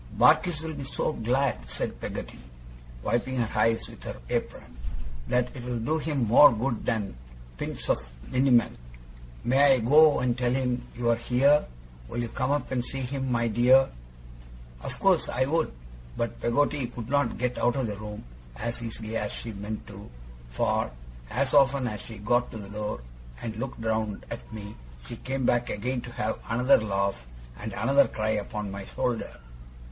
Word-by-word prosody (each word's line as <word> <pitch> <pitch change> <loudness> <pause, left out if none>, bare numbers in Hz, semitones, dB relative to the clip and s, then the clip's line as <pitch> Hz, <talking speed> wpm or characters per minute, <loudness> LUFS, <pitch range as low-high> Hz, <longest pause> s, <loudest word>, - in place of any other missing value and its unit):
'Barkis 165 -3 +4
will 160 -1 -4
be 140 -2 -6
so 135 +3 -1
glad,' 120 - 0
said - - -4
Peggotty, - - -6 0.6
wiping 120 +2 0
her 115 -2 +1
eyes 115 0 +2
with - - -13
her - - -6
apron, - - -3 0.5
'that 125 +1 +1
it'll 125 -1 -3
do 155 +8 0
him 145 -5 0
more 125 +7 +9
good 120 +1 -1
than 105 - -1 0.4
pints - - -4
of - - +2 0.3
liniment. 125 - +3 0.6
May 135 +2 +5
I - - 0
go 150 +6 +6
and 125 -2 +1
tell 125 -1 0
him 125 -1 -1
you 120 -1 +1
are - - +4
here? 135 +5 +3 0.4
Will 120 - -4
you 115 - -4
come 130 +3 -1
up 145 -2 0
and 125 -2 0
see 135 +2 -4
him, 130 0 -2
my 120 -1 +2
dear?' 125 +4 +5 0.9
Of - - -6
course - - +3
I 130 +1 +1
would. 160 +5 +1 0.5
But 115 - -3
Peggotty 140 +2 +1
could 120 -2 -7
not 140 +2 +1
get 125 0 -1
out 120 - +2
of 135 -2 0
the 105 -2 -3
room 105 0 -7 0.3
as 120 - -4
easily 115 -1 -5
as 105 -1 -2
she 115 - -6
meant 105 +2 -5
to, 100 0 -11 0.4
for - - 0 0.4
as 140 0 0
often 140 -2 +5
as 105 -4 -3
she 110 - -9
got 120 +4 +1
to - - -5
the 100 -2 -8
door 105 -7 -4 0.4
and 110 -1 -5
looked 130 +3 -5
round 110 -2 -1
at - - -7
me, 105 -1 -7 0.3
she - - -7
came 135 0 -2
back 120 0 +2
again 125 +4 -2
to 120 - -9
have 110 +1 -2
another 125 +4 +5
laugh 100 - -1 0.3
and - - -5
another 135 +6 +4
cry 110 0 -1
upon 105 -1 -3
my 100 0 -6
shoulder. 115 - -3
120 Hz, 175 wpm, -27 LUFS, 110-135 Hz, 0.9 s, more